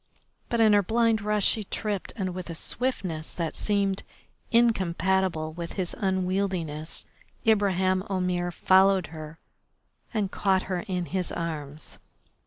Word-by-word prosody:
But 235 - 0
in 220 -2 +6
her 205 - +6
blind 225 +2 +2
rush 210 -1 +1
she 220 - +3
tripped, 205 -1 -3
and 190 -5 -2
with 180 -1 -6
a 165 - -4
swiftness 185 -8 -2
that 165 -2 -2
seemed 200 -2 0 0.5
incompatible 190 -7 +2
with 170 0 -6
his 185 -3 -3
unwieldiness 185 -5 -1 0.4
Ibraheim 190 -4 +3
Omair 180 -2 0
followed 190 +1 +4
her 155 0 -8 0.7
and 210 -4 -1
caught 190 -2 +2
her 185 -2 -2
in 180 -2 -1
his 185 +1 -2
arms. 155 -3 -5
190 Hz, 130 wpm, -27 LUFS, 175-205 Hz, 0.7 s, in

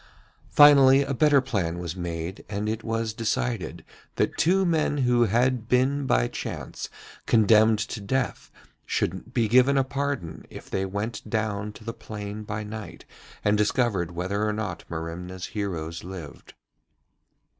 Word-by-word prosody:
Finally, 140 -2 +7
a 135 - -2
better 145 +1 +4
plan 95 -10 -2
was 90 -1 -5
made, 85 0 -5
and 105 +1 -2
it 110 +1 -2
was 115 -1 -2
decided 115 +1 -2 0.3
that - - 0
two 190 +3 +3
men 160 -3 +1
who 125 -3 +3
had 120 +1 +1
been 135 +2 +2
by - - +3
chance - - -6 0.4
condemned 110 -1 +5
to 110 +1 -4
death 125 +6 -2 0.4
should 115 - -2
be 120 -4 +1
given 130 +5 +5
a 135 - +4
pardon 140 - -3
if - - -11
they 95 0 0
went 105 +5 -4
down 105 -2 -1
into 105 +1 -10
the 115 +1 -5
plain 105 -1 -7
by 105 0 -4
night 110 0 -8 0.4
and 105 0 +3
discovered 105 -5 +1
whether 95 +4 -2
or 105 0 +1
not 105 -5 -4
Merimna's 85 +3 -5
heroes 85 -6 -4
lived. 90 -5 -9
110 Hz, 145 wpm, -26 LUFS, 95-125 Hz, 0.4 s, Finally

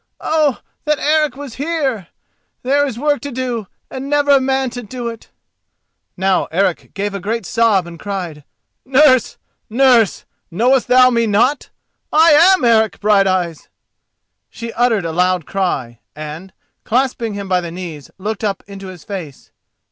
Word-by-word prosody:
Oh, 305 -5 +1 0.2
that 300 0 +1
Eric 300 -2 +1
was 275 -4 -9
here! 280 - -2 0.6
there 285 +3 +2
is 245 -4 -5
work 290 +2 0
to 285 - -6
do 240 -4 -3 0.2
and 265 +1 -6
never 290 0 +2
a 275 -1 +5
man 265 -1 0
to 245 0 -6
do 240 +1 -5
it." 230 -1 -11 0.9
Now 190 0 +1
Eric 180 0 -1
gave 205 0 -2
a 200 - -4
great 220 +3 -3
sob 220 -5 +2
and 170 -1 -11
cried, 180 -7 -5 0.4
"Nurse, 260 -2 +3 0.3
nurse! 240 -3 +3 0.2
knowest 240 +8 +2
thou 255 0 +6
me 235 -1 +1
not! 240 +7 +1 0.4
I 320 +2 +6
am 340 +1 +5
Eric 220 -2 +3
Brighteyes." 190 -5 +1 0.8
She 230 -1 -7
uttered 230 -6 +1
a 165 - -2
loud 180 0 +1
cry, 135 - -2 0.2
and, 155 +5 -8 0.3
clasping 240 -2 -1
him 200 -1 -5
by 185 -1 +1
the 170 - -6
knees, 165 -6 -8
looked 210 +3 -4
up 200 -2 -2
into 195 -1 -10
his 185 -4 -11
face. 175 -9 -8
225 Hz, 155 wpm, -17 LUFS, 190-265 Hz, 0.9 s, thou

